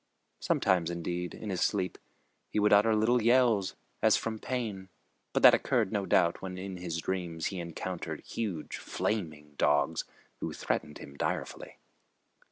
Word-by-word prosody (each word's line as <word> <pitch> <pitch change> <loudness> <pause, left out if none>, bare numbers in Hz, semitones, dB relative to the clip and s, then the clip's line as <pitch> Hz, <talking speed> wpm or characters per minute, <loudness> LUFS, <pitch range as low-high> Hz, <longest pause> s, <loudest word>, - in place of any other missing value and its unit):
Sometimes, 90 -4 +2
indeed, 85 +1 -3
in 105 - -5
his 90 - -2
sleep, 95 -3 0 0.5
he - - -4
would 105 0 +4
utter 105 +2 +5
little 115 +3 +3
yells, 115 -4 +3 0.3
as - - +5
from 110 -1 -3
pain, 105 -7 -4 0.4
but - - 0
that - - +10
occurred, - - +2
no 100 -3 -1
doubt, 85 0 +3
when 95 -1 -5
in 95 0 -5
his 85 -2 -4
dreams 85 -2 -3
he 95 - -4
encountered 85 +1 -5
huge 95 -9 -4
flaming 75 -8 -3
dogs 75 +2 +2 0.3
who - - -3
threatened 75 - -2
him 70 - -11
direfully. - - -3
95 Hz, 150 wpm, -30 LUFS, 85-105 Hz, 0.5 s, that